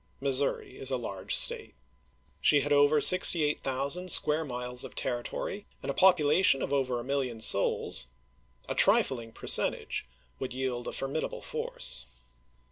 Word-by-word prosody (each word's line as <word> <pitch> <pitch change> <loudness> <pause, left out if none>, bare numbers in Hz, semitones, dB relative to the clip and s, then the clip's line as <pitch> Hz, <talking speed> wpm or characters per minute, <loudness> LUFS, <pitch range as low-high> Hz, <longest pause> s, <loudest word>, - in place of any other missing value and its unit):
Missouri 135 -1 -1
is 135 - +2
a 130 - -1
large 100 -6 -4
State. - - +2 0.7
She 145 - +3
had 145 +1 -1
over 145 +1 +3
68,000 150 -1 +3
square 155 -1 +2
miles 125 -2 -4
of - - -11
territory, 125 +11 -5 0.2
and - - -3
a - - -6
population 165 -3 +3
of 140 - -4
over 130 -3 -1
a - - -7
million 130 -3 -3
souls; 110 - 0 0.6
a - - -3
trifling 115 -3 +4
percentage 65 - 0 0.3
would 130 -2 -5
yield 130 -2 -4
a - - -4
formidable 135 +4 -4
force. 65 -2 -5
135 Hz, 135 wpm, -28 LUFS, 125-150 Hz, 0.7 s, trifling